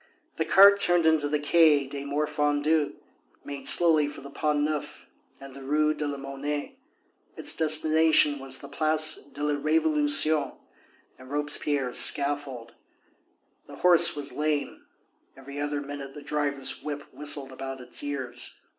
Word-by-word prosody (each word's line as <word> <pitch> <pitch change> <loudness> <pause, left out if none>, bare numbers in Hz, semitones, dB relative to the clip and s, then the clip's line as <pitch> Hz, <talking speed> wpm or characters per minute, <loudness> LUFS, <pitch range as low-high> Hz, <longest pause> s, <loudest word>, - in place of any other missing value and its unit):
The - - -2
cart 200 +1 +5
turned 175 -3 +4
into 160 -2 +1
the 150 - -1
Quai 150 -1 +2
des 140 +1 -8
Morfondus, 150 +1 -1 0.5
made 140 -1 -6
slowly 160 -4 +4
for 145 - -10
the 140 +1 -12
Pont 150 0 -2
Neuf 150 0 -5 0.3
and 135 -1 -13
the 140 - -12
Rue 150 +3 0
de 150 -1 -5
la 145 -1 -5
Monnaie; 140 +2 -7 0.6
its - - +2
destination 155 -1 +3
was 135 0 +2
the 140 - -10
Place 155 +2 +1
de 145 - -8
la 150 0 -1
Révolution 150 -1 +3 0.6
and 130 0 -15
Robespierre's 145 -2 -1
scaffold. 140 -4 0 0.9
The - - -12
horse 175 -2 +4
was 145 -1 -4
lame; 150 -1 -4 0.5
every 140 +1 -10
other 145 0 -4
minute 140 -1 -9
the 145 - -11
driver's 145 -2 -2
whip 145 -1 -7
whistled 145 -2 0
about 135 0 -8
its 125 -1 0
ears. 130 -4 -5
145 Hz, 145 wpm, -25 LUFS, 140-155 Hz, 0.9 s, cart